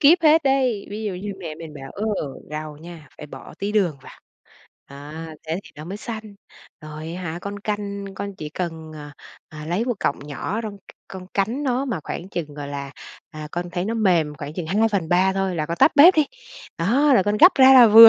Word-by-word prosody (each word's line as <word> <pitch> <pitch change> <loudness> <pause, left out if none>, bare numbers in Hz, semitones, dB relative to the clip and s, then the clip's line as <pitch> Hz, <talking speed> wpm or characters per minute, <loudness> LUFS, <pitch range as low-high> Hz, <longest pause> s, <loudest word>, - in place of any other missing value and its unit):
kíp 310 +5 +7
hết 320 +1 +6
đấy. 260 -6 +1
Ví 210 +2 -5
dụ 205 - -1
như 200 +3 -5
mẹ 165 -5 -6
mình 160 -1 -10
bảo: 135 -2 -9
"Ơ, 205 - -4 0.5
rau 155 0 -5
nha, 160 -1 -11
phải 150 - -8
bỏ - - -11
tí 200 +1 -2
đường 185 -8 +2
vào, - - -12 0.8
đó, 140 +2 -9 0.4
thế 165 +4 -1
thì - - -14
nó 150 - -8
mới 190 +3 -5
xanh. 215 -2 -7 0.5
Rồi 155 +1 -7
á 185 - -6
hả, 170 -1 -4
con 200 0 -5
canh, 200 -1 -3
con 200 +1 -5
chỉ 155 - -6
cần, 160 -1 -5
ờ, 145 -1 -9 0.4
ờ, 155 -1 -9
lấy 180 +7 0
một 245 -1 0
cọng - - 0
nhỏ 170 +9 -3
rong 210 -2 -5
c - - -31 0.3
con 185 -1 -8
cắn 225 +8 0
nó, 260 -1 0
mà 235 - -2
khoảng 180 - -5
chừng, 155 -6 -5
gọi 145 -1 -6
là, 140 -1 -5 0.4
à, 155 -2 -7
con 175 0 -3
thấy 175 +1 -2
nó 220 +3 -1
mềm 175 -9 +2
khoảng 145 0 -6
chừng 175 -2 -4
2/3 190 -2 +2
thôi 195 -1 -1
là 155 - -1
con 170 - -3
tắt - - +6
bếp 335 +6 +9
đi. 310 -2 +3 0.5
Đó 260 - +3
là 195 - +5
con 205 +2 +1
gắp 355 - +9
ra 265 0 +8
là 250 -2 +10
vừa." 225 +1 +12
190 Hz, 225 wpm, -23 LUFS, 155-220 Hz, 0.8 s, vừa